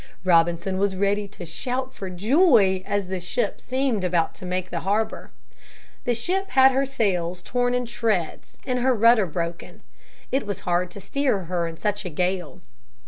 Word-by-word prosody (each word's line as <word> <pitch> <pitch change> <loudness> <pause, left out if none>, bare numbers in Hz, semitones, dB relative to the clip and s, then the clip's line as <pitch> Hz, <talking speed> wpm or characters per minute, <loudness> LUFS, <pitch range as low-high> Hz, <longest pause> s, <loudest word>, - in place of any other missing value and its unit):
Robinson 175 +1 +2
was 200 -1 +1
ready 200 +1 0
to 190 -2 -10
shout 255 +10 -4
for 190 - -6
joy 210 - +4
as 205 -1 0
the 185 0 -4
ship 180 +8 -2
seemed 255 -6 -1
about 175 -2 +1
to 185 - -9
make 185 0 -3
the 170 - -2
harbor. 210 +5 -1 0.8
The 245 - +1
ship 375 - -2
had 265 0 +6
her 270 +1 +1
sails 180 -8 -1
torn 245 +3 0
in 250 0 0
shreds 220 -7 -2
and 250 -1 0
her 255 +1 +2
rudder 230 -2 +5
broken. 170 +1 -5 0.5
It 265 -4 0
was 200 -3 -4
hard 175 0 0
to 200 - -10
steer 260 -1 0
her 175 -1 -2
in 165 0 -7
such 205 +1 -2
a 180 - -4
gale. 180 +1 -2
200 Hz, 175 wpm, -24 LUFS, 180-245 Hz, 0.8 s, had